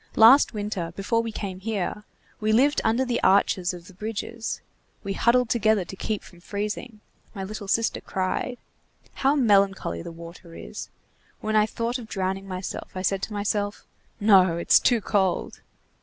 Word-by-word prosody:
Last 240 +6 +7
winter, 205 -6 -3
before 230 +4 0
we 230 -1 -4
came 195 -3 -5
here, 210 0 -3 0.3
we 215 0 +1
lived 275 +7 +4
under 230 +4 +2
the 245 -1 -1
arches 190 -1 +3
of 175 -2 -10
the 190 - -14
bridges. 220 +3 -4 0.4
We 195 - -2
huddled 235 +2 +3
together 220 -4 +2
to 190 - -8
keep 210 +2 -3
from 175 - -16
freezing. 210 +4 -5 0.3
My 195 - -4
little 205 +1 -6
sister 225 +3 +1
cried. 190 +6 -2 0.6
How 275 +2 +2
melancholy 195 - +2
the - - -7
water 170 0 -11
is! - - -8 0.5
When 215 0 -2
I 215 0 +5
thought 235 +3 -2
of 230 - -9
drowning 195 -1 -3
myself, 185 0 -5
I 185 - -3
said 195 0 +1
to 215 - -4
myself: 205 0 -2 0.3
'No, 190 -5 +5
it's 170 - +5
too 240 -3 +2
cold. 190 -3 0
205 Hz, 165 wpm, -25 LUFS, 190-225 Hz, 0.6 s, Last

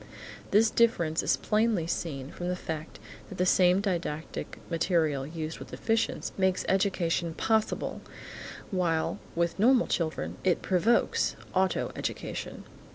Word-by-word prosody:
This 220 +2 +4
difference 170 -9 +2
is - - +2
plainly 215 -5 +1
seen 145 -5 -3
from 175 - -5
the 180 - 0
fact 160 -3 -6 0.3
that 190 - -8
the 180 - +2
same 180 +1 +4
didactic 170 -6 -3
material 165 -5 +1
used 160 0 -5
with - - -9
deficients 225 0 -1
makes 190 -1 +2
education 175 -4 +1
possible, 220 -1 0 0.7
while 170 -4 0 0.2
with 170 +2 0
normal 245 +3 +5
children 160 -2 -2
it 180 -2 +2
provokes 195 +6 +2 0.2
auto 190 0 +1
education. - - -5
180 Hz, 125 wpm, -29 LUFS, 165-200 Hz, 0.7 s, normal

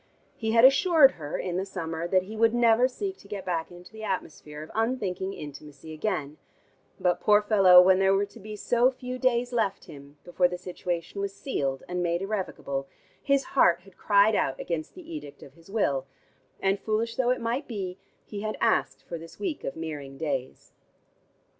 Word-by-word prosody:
He 220 -1 -2
had 230 +1 +7
assured 300 0 +6
her 150 - -5
in 180 -1 -3
the 190 - 0
summer 170 -4 -4
that 185 +1 +3
he 210 +4 -9
would 225 +1 +3
never 240 +1 +5
seek 385 +9 -5
to - - -16
get 195 -2 -6
back 170 -3 -2
into 175 0 -13
the 220 0 -9
atmosphere 155 -6 -5
of 155 - -12
unthinking 210 -5 -1
intimacy 150 0 -10
again, 155 -4 -3 0.6
but, 180 -1 +1
poor 210 -1 +5
fellow, 195 -4 +7
when 185 0 +5
there 195 0 +4
were 200 +1 +2
to 205 +3 -16
be 215 +1 -8
so 240 +4 +3
few 255 -1 -6
days 245 -1 +1
left 220 -5 -1
him, 140 0 -13
before 180 0 +2
the 180 0 -5
situation 180 +1 -4
was 200 0 -3
sealed 135 - -2
and 180 0 -2
made 170 +1 0
irrevocable, 180 -9 -3 0.3
his 275 -1 +2
heart 175 -10 +4
had 190 0 -19
cried 205 +1 +4
out 135 -9 0
against 165 -3 -4
the 360 -3 -12
edict 310 - -8
of 135 - -14
his 165 +4 -20
will 140 -11 0 0.5
and, 195 +1 +1
foolish 225 +2 -1
though 250 -2 +1
it 255 - +1
might 235 +5 -2
be, 195 -5 -5 0.3
he 205 -1 -6
had 215 0 -3
asked 230 - +1
for 170 - -6
this 165 +1 -12
week 355 -7 -3
of - - -4
Meering 150 -4 -6
days. 135 -4 -4
195 Hz, 190 wpm, -27 LUFS, 165-230 Hz, 0.6 s, had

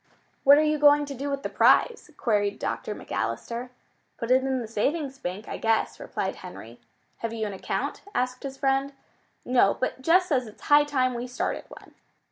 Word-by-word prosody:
"What 280 +1 +8
are 305 - +4
you 305 0 +1
going 290 0 +6
to 285 - -6
do 275 +2 -4
with 280 0 -3
the - - -1
prize?" 470 -2 +3
queried 205 -4 +1
Dr. - - -3
McAllister. 240 +2 -4 0.5
"Put 230 0 -3
it 260 +1 +5
in 265 -1 0
the 235 - -5
savings 270 +5 -2
bank, 190 0 -5
I - - -5
guess," 225 0 0
replied - - -4
Henry. - - -11 0.4
"Have 230 0 -4
you 220 -1 -2
an 205 - -4
account?" 190 - -3
asked 250 0 -1
his 270 -1 -6
friend. 270 0 0 0.5
"No, 245 -5 +3
but 255 0 -2
Jess 355 +6 +4
says 255 -6 +1
it's 215 - -14
high 290 0 +5
time 260 -3 +1
we 240 +1 -4
started 250 - -3
one." - - -14
260 Hz, 190 wpm, -26 LUFS, 230-285 Hz, 0.5 s, What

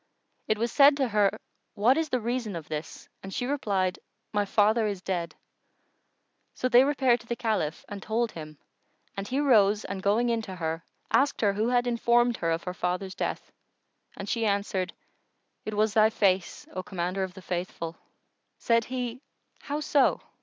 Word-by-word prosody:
It 215 - +1
was 230 +2 -1
said 280 0 +6
to 265 -4 +1
her, 205 -2 +2 0.4
"What 230 +6 +4
is 320 -1 -1
the 255 - +1
reason 235 -3 -2
of 160 -2 -7
this?"; 155 +1 -6
and 195 - -8
she 245 - -2
replied, 200 -9 0 0.3
"My 205 -1 +1
father 215 +2 +3
is 200 -2 -3
dead." 170 -4 -3 1.2
So 255 - 0
they 245 0 +7
repaired 265 -4 +2
to 235 - -17
the 235 - -2
Caliph 215 -10 -2
and 205 -1 -7
told 225 +3 -1
him 155 -2 -9 0.6
and 195 0 -4
he 265 +5 -1
rose 215 -7 +4
and 190 0 -5
going 215 +5 +2
in 230 -1 +1
to 190 -4 -7
her, 165 -1 -3 0.3
asked 280 +1 +3
her 205 -3 +3
who 215 +4 0
had 245 0 +2
informed 240 0 +2
her 165 - -1
of 165 0 -1
her 180 - -4
father's 180 +1 -2
death; - - -4 0.7
and - - -6
she 230 -2 -1
answered 200 -3 0 0.7
"It 215 - -4
was 215 0 +2
thy 215 0 +5
face, 195 -4 0
O 185 - -3
Commander 185 +1 -3
of 185 -1 -3
the 190 - -11
Faithful!" 175 -2 -4 0.6
Said 230 -1 +2
he, 250 -1 -4 0.4
"How 295 +1 -4
so?" 285 -2 +3
210 Hz, 180 wpm, -27 LUFS, 185-240 Hz, 1.2 s, they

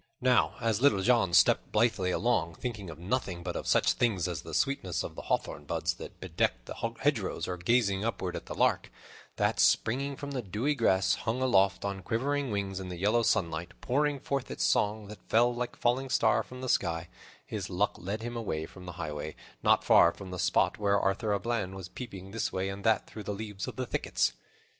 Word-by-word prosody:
Now 125 -1 +3
as 115 -1 0
Little 105 -9 +4
John 115 -4 +3
stepped - - +4
blithely 105 -4 +2
along, 90 -5 +1
thinking 105 -5 -5
of 80 - -8
nothing 90 -1 -2
but - - -4
of - - -4
such - - +4
things 100 -8 +1
as 85 -4 -3
the - - -6
sweetness 135 - 0
of - - -6
the - - -7
hawthorn 75 +1 -2
buds - - -1
that - - -10
bedecked - - -1
the - - -6 0.3
hedgerows, 130 -9 0
or 90 - -2
gazing 100 +1 +2
upward 100 -5 -2
at - - -7
the - - -5
lark, - - +2 0.5
that, - - +1
springing 130 - +2
from 145 +1 -6
the 130 -2 -2
dewy 110 +8 -1
grass, 95 -8 +3
hung 120 +2 -2
aloft 100 -7 +3
on 100 -1 -3
quivering 135 +7 -1
wings 100 -2 -2
in 95 -1 -6
the 90 - -6
yellow 105 +6 +2
sunlight, 85 -5 -1
pouring 145 +2 +1
forth 135 -1 -2
its - - -3
song 105 0 +1
that 105 +1 -10
fell 120 +2 +4
like 120 0 -4
a - - -26
falling 130 +2 +1
star - - +3
from 125 0 -10
the 130 - -4
sky, 85 -4 0 0.4
his 100 -3 -5
luck 100 +3 +1
led 105 +5 -4
him 120 0 -4
away 80 -9 -2
from 90 +2 -12
the 90 - -6
highway, 75 -2 -5 0.3
not - - +4
far 85 - +6
from 95 0 -10
the 90 - -5
spot - - +2
where 100 -1 +3
Arthur 100 +3 0
a 100 - +1
Bland 105 -5 -2
was 95 -2 -7
peeping 95 -6 -8
this 115 +1 -2
way 95 +1 -1
and 100 +1 -6
that 110 -1 +3
through 110 - -9
the 105 0 -4
leaves 105 -2 -5
of - - -6
the 130 - -2
thickets. - - 0
105 Hz, 215 wpm, -30 LUFS, 90-120 Hz, 0.5 s, far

